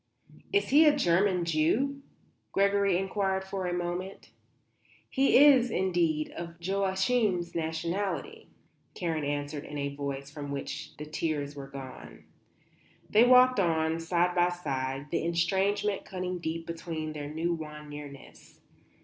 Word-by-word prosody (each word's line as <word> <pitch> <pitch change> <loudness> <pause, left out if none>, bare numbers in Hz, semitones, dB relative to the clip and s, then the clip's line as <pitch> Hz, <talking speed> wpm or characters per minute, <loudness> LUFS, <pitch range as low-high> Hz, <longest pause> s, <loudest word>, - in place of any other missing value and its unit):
"Is 405 0 +1
he 305 +3 +7
a 295 - +5
German 180 -5 +2
Jew?" 215 - +1 0.5
Gregory 200 -1 +3
inquired 190 0 -1
after 190 -1 -4
a - - -1
moment. 175 +2 -4 0.8
"He 270 +1 +4
is, 265 -3 +7
indeed, 175 -6 0
of 170 -1 -7
Joachim's 190 +1 0
nationality," 170 - -3 0.5
Karen 165 -4 -2
answered, 145 +1 -3
in 150 - -7
a 140 0 -2
voice 140 -1 -5
from 145 -1 -7
which 140 +2 -6
the 150 - -6
tears 150 -2 -3
were 140 -1 -7
gone. 135 -2 -10 0.9
They 220 +3 +6
walked 255 -1 +6
on, 160 -2 +1
side 175 +1 +1
by 175 0 +3
side, 135 -4 -4
the 170 - 0
estrangement 190 +4 +1
cutting 185 -1 -4
deep 165 0 -4
between 165 -2 -5
their 145 -1 -6
new 165 +3 -1
won 150 -2 -7
nearness. 145 -2 -11
170 Hz, 130 wpm, -29 LUFS, 155-195 Hz, 0.9 s, he